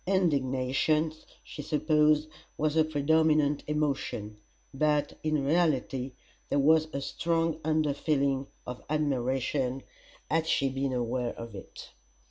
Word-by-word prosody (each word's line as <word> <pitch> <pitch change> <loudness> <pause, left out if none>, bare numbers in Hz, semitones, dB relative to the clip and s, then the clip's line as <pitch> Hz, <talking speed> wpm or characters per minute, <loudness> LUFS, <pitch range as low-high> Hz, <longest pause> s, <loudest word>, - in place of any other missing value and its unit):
Indignation, 150 -3 +1 0.3
she - - -8
supposed, 150 0 +2 0.3
was 155 0 +1
her 160 0 +4
predominant 155 -1 +2
emotion; 140 -8 -2 0.4
but, 150 +1 +1
in 155 -3 0
reality, 135 -5 +1 0.4
there - - +1
was 155 +3 +4
a 140 - -3
strong 165 +1 -1
under 155 -2 +1
feeling 140 -2 0 0.2
of 125 0 -6
admiration, 135 -2 0 0.4
had 160 0 0
she 135 -3 +2
been 135 0 -2
aware 120 0 -1
of 115 -1 -8
it. 95 - -10
145 Hz, 115 wpm, -29 LUFS, 135-155 Hz, 0.4 s, her